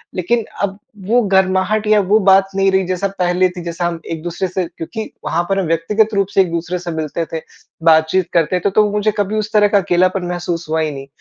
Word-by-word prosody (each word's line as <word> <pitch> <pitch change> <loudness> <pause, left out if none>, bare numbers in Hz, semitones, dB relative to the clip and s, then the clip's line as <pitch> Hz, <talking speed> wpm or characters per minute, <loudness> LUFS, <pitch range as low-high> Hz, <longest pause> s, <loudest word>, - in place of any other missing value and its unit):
लेकिन 225 +6 0 0.2
अब 195 -1 -1 0.3
वो 240 +4 +3
गर्माहट 190 +3 +2
या 215 -1 +5
वो 215 +2 +5
बात 195 0 +5
नहीं 195 0 +3
रही 190 0 +2
जैसा 185 +1 -1
पहले 180 +1 +2
थी 180 0 -8
जैसे 170 +1 -4
हम 170 -1 -1
एक 160 - -4
दूसरे 175 +2 -3
से 185 0 -2
क्योंकि 220 +7 -6 0.2
वहाँ 170 +1 0
पर 195 - +1
हम 190 - -1
व्यक्तिगत 210 +7 +1
रूप 200 -1 +1
से 195 - +5
एक 180 -3 -1
दूसरे 170 +2 -3
से 175 -1 -5
मिलते 160 +1 -3
थे, 160 - -3 0.4
बातचीत 160 +3 +3
करते 170 +2 +2
थे। - - +4
तो 210 +2 +3
वो 210 - -1
मुझे 210 +1 +1
कभी 205 +1 -1
उस 215 0 -3
तरह 210 -1 +5
का 205 - +3
अकेलापन 185 0 +1
महसूस 175 -1 -3
हुआ 160 +1 0
ही 155 - -1
नहीं। 135 -1 -8
185 Hz, 235 wpm, -17 LUFS, 170-200 Hz, 0.4 s, या